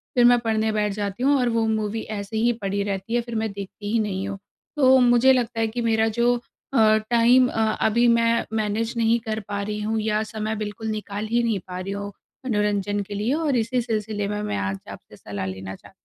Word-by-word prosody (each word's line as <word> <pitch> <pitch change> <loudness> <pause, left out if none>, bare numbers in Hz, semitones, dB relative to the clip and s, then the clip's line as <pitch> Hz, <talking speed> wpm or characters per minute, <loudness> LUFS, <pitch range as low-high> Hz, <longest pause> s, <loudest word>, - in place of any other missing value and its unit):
फिर 245 -1 +5
मैं 245 0 +6
पढ़ने 220 -1 0
बैठ 210 -1 0
जाती 205 +2 -4
हूँ 280 +1 +4
और 245 -1 +2
वो 230 -1 +1
मूवी 220 0 -1 0.2
ऐसे 200 +2 -5
ही 235 +2 +3
पड़ी 200 0 -1
रहती 200 +2 -4
है 240 - +2
फिर 235 -1 -7
मैं 220 -1 -1
देखती 200 +1 -7
ही 230 - +3
नहीं 195 -2 -2
हूँ। 200 -1 -5 0.4
तो 265 -2 +6
मुझे 245 +1 +5
लगता 240 -2 -1
है 225 - +2
कि 235 +2 -4
मेरा 225 -1 +2
जो 240 +1 +4 0.4
अ, 220 -4 +5
टाइम 240 +2 +5
अ, 225 - -1 0.2
अभी 235 +2 +3
मैं 230 0 +3
मैनेज 220 +2 -1
नहीं 230 0 +3
कर 215 0 -1
पा 200 -1 -3
रही 210 +1 -3
हूँ 220 +1 -1
या 215 0 0
समय 220 0 -4
बिल्कुल 215 +1 -5
निकाल 210 -1 -4
ही 240 0 +2
नहीं 225 -4 0
पा 180 0 -6
रही 190 +2 -5
हूँ, 200 0 -5 0.3
मनोरंजन 205 -3 0
के 205 - -6
लिए 215 +6 0
और 300 -4 +1
इसी 240 +2 0
सिलसिले 215 -3 -2
में 210 0 -3
मैं 210 - -2
आज 100 0 -2
आपसे - - -12
सलाह 100 -2 -6
लेना 95 0 -6
चाह - - -17
220 Hz, 225 wpm, -24 LUFS, 205-235 Hz, 0.4 s, मैं